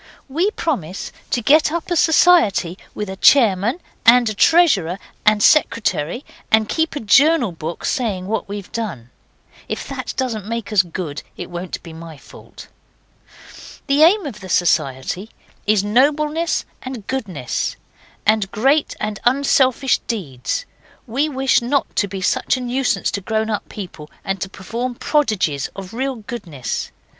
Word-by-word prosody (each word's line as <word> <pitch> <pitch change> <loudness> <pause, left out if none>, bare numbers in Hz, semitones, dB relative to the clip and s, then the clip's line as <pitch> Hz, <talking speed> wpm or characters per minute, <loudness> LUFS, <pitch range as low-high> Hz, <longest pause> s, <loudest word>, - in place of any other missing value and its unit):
'We 330 +9 +1
propose 200 - -3 0.2
to 240 - -1
get 300 +4 +5
up 340 +1 -4
a - - +2
society, 315 - +4 0.2
with 210 - -4
a 190 - -5
chairman 225 - +4 0.2
and 240 0 +6
a - - -2
treasurer 205 - +4 0.3
and 210 -1 +4
secretary, 230 - +2 0.3
and 220 -1 +4
keep 320 +5 -1
a - - -2
journal 275 - +4
book 165 0 -6
saying 210 -9 -1
what 215 +1 -3
we've 200 -2 -7
done. 170 - -5 0.6
If - - -4
that - - -5
doesn't 225 -6 -2
make 230 -1 -4
us 200 - +6
good 165 -4 -6 0.2
it - - -7
won't 175 +1 -6
be 165 - -10
my 165 -1 -10
fault. - - -14 1.2
'The 280 +1 +2
aim 370 +5 +5
of 240 -7 -6
the 190 - -10
society 160 +3 0 0.4
is 210 -2 +3
nobleness 300 +9 +1 0.2
and 255 -5 -7
goodness, 195 - -3 0.5
and 215 -2 +2
great 275 +7 +2
and 215 -1 -3
unselfish 265 0 +3
deeds. 145 - -3 0.4
We 275 +6 0
wish 265 -3 +2
not 270 +4 -1
to 205 - +2
be 195 0 -6
such 185 - +1
a - - -5
nuisance 250 +1 0
to 200 - -3
grown 220 +2 -1
up 210 - -3
people 170 -7 -8 0.2
and 195 -1 -2
to 190 - -3
perform 235 +6 -5
prodigies 215 - 0
of 195 +1 -8
real 265 +3 -2
goodness. 205 - -5
220 Hz, 150 wpm, -20 LUFS, 185-270 Hz, 1.2 s, and